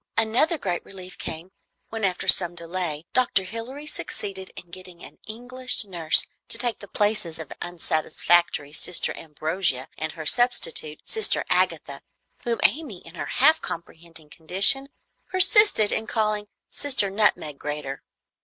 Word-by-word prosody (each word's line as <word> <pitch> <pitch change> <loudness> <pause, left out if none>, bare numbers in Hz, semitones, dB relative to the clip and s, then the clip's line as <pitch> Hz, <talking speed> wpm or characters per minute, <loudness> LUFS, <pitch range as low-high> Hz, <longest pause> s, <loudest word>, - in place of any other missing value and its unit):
Another 235 +10 +2
great 180 - -3
relief 185 -1 -11
came, 165 +4 -7 0.4
when, 225 -1 -6
after 190 0 -1
some 175 -2 +8
delay, 170 -2 -4
Dr. 245 -6 +2
Hilary 230 +9 -8
succeeded 195 -9 -6
in 175 - -13
getting 180 -1 -13
an - - -12
English 245 +1 -2
nurse 170 -5 +3 0.2
to - - -4
take 240 -2 -3
the 200 - -11
places 205 -5 -1
of 160 -3 -9
the - - -11
unsatisfactory 165 -2 0
Sister 180 +3 -2
Ambrogia 155 -3 -2
and 155 0 -4
her 160 -2 -8
substitute, 240 -9 0
Sister 440 -1 +2
Agatha, - - 0 0.4
whom 235 -1 -1
Amy 275 - +1
in 165 - -12
her - - -6
half 310 +5 +3
comprehending 165 -2 -9
condition 195 - +3 0.4
persisted 370 - +5
in 220 - -2
calling 210 -1 -1 0.2
"Sister 260 -9 0
Nutmeg 195 -8 0
Grater." 145 -2 -6
190 Hz, 140 wpm, -24 LUFS, 165-230 Hz, 0.4 s, some